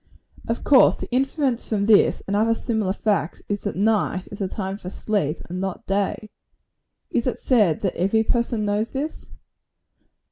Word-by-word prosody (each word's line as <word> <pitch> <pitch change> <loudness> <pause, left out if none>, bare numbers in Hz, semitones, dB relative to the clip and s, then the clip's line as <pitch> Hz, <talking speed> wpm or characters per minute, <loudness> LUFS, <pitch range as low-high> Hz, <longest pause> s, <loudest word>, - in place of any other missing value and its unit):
Of 230 - -2
course, 275 -3 +6
the - - -6
inference 265 -1 0
from 205 -2 0
this, 215 -1 +4
and 200 - -1
other 225 +2 +3
similar 220 -5 -1
facts, 200 -4 -1
is, 205 0 -2
that 205 - -4
night 205 -2 +1
is 205 - -8
the 195 - -1
time 190 0 -4
for 180 - -7
sleep, 190 -6 -2
and 180 +1 -5
not 190 -1 -4
day. 200 +2 -2 0.8
Is 235 - 0
it 250 - -1
said 210 - +2
that 190 - -1
every 200 +5 +2
person 235 -2 0
knows 210 +2 0
this? 290 +4 -5
210 Hz, 170 wpm, -23 LUFS, 195-230 Hz, 0.8 s, course